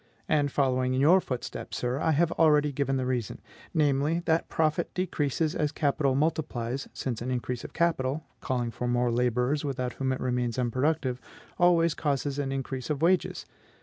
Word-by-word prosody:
And 145 -2 +2
following 130 -2 +1
in - - +1
your 170 +7 +6
footsteps, 125 -7 -5
sir, 125 +2 -1
I 160 - +1
have 170 +3 +2
already 150 -2 +4
given 135 -1 0
the 130 - -1
reason; 125 -4 -2 0.3
namely, 150 +2 +2
that 160 +1 +1
profit 155 -1 0
decreases 155 -4 0
as 150 -1 0
capital 140 -2 +1
multiplies, 140 -4 -1
since 120 -4 -4
an 125 - -3
increase 125 -1 -3
of - - -9
capital 160 -3 0
calling 120 -2 -2
for 125 +2 -4
more 120 0 +1
laborers, 125 +4 +1
without 130 -3 -2
whom 135 -1 -1
it 130 - -2
remains 125 -1 -1
unproductive 130 +1 0 0.4
always 170 -2 +4
causes 145 -2 -1
an 135 -1 -1
increase 135 -2 -4
of 150 0 -1
wages. 180 +2 +1
135 Hz, 170 wpm, -28 LUFS, 125-155 Hz, 0.4 s, your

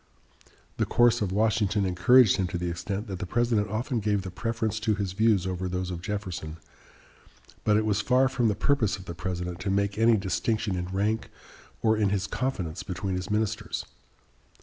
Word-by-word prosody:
The - - 0
course 120 -1 +4
of 100 -3 0
Washington 105 -1 +1
encouraged 95 +6 +5
him 95 - 0
to 85 - -3
the 85 0 -2
extent 100 +5 -4
that 95 -4 -6
the 95 - -4
President 115 -1 +1
often 115 +4 -1
gave 105 -2 0
the 95 - -6
preference 110 +3 -2
to 110 -1 +1
his 100 -2 -2
views 105 -2 +3
over 95 0 -2
those 90 0 -3
of 85 -1 -5
Jefferson, 95 -6 -5 1.1
but 105 -1 +3
it 110 - +1
was 105 -1 +1
far 130 +4 +3
from 125 -3 +1
the 105 - +1
purpose 110 -2 +1
of 95 - -12
the 85 - -6
President 90 0 -4
to 95 - -3
make 100 +1 0
any 115 0 +5
distinction 105 +1 -1
in 90 0 -2
rank 100 +4 -1 0.5
or 110 -1 +4
in 105 -2 +2
his 100 0 0
confidence 100 -10 -3
between 95 +1 -4
his 90 0 -3
ministers. 105 0 -1
105 Hz, 190 wpm, -27 LUFS, 95-110 Hz, 1.1 s, encouraged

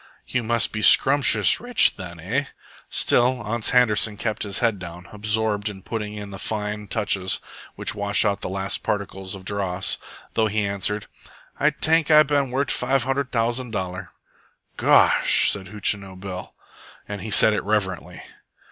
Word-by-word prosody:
"You 125 - -2
must 115 0 +1
be 110 - -3
scrumptious 125 -6 +6
rich, 245 -1 +3
then, 85 -3 -9
eh?" 120 - -2 0.4
Still 125 +1 +1
Ans 110 +1 -1
Handerson 110 -4 +2
kept 110 0 -3
his 100 -2 -2
head 115 -4 0
down, 85 0 -10
absorbed 105 0 0
in 95 -2 -11
putting 105 -2 -5
in 105 -1 -8
the 95 - -8
fine 105 0 -4
touches 100 -4 0 0.4
which - - 0
wash 100 +1 +1
out 100 -1 -1
the - - -4
last 95 +1 -3
particles 95 -1 -4
of 95 -1 -12
dross, 95 -2 -1 0.3
though 110 -1 +1
he 105 0 -1
answered, 100 +1 -3 0.5
"Ay - - +3
tank 160 -1 +1
Ay 155 -1 +7
ban 140 -2 0
wort' 135 +2 -1
five 130 +1 0
hundred 135 +1 -2
t'ousand 120 +2 -1
dollar." 95 -2 -5 0.7
"Gosh!" - - +4
said 95 -1 -4
Hootchinoo 100 -1 -2
Bill, 95 -1 -8 0.5
and 100 -2 -6
he 110 - -6
said 110 +1 +6
it - - -2
reverently. 100 -3 -3
105 Hz, 160 wpm, -22 LUFS, 100-120 Hz, 0.7 s, Ay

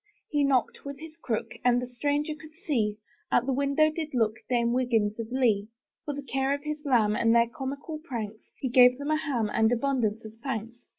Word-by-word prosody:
He 295 -2 +2
knocked 270 -3 +1
with 280 -1 -7
his 320 0 -10
crook. 235 -9 -3
And 245 0 +4
the 250 - -3
stranger 290 +5 -1
to 300 +1 -12 0.2
see, 215 -8 0 0.3
Out 240 - +3
the 270 - 0
window 280 +3 +3
did 310 -3 -5
look 220 -2 +2
Dame 235 -1 +2
Wiggins 230 -4 +1
of 230 0 -5
Lee. 225 -6 +2 0.4
For 290 - -3
the 285 - -6
care 270 +1 0
of 285 - -9
his 300 0 -4
lamb. 230 -7 +3
And 230 +1 +3
their 235 0 +5
comical 280 +4 -5
pranks, 225 -9 -5 0.2
He 265 - -2
gave 250 0 +6
them 285 +2 -3
a 310 - +3
ham 245 -8 -1
And 220 +1 +3
abundance 235 -4 0
of 220 - -9
thanks. 235 -3 -5
255 Hz, 210 wpm, -28 LUFS, 230-285 Hz, 0.4 s, gave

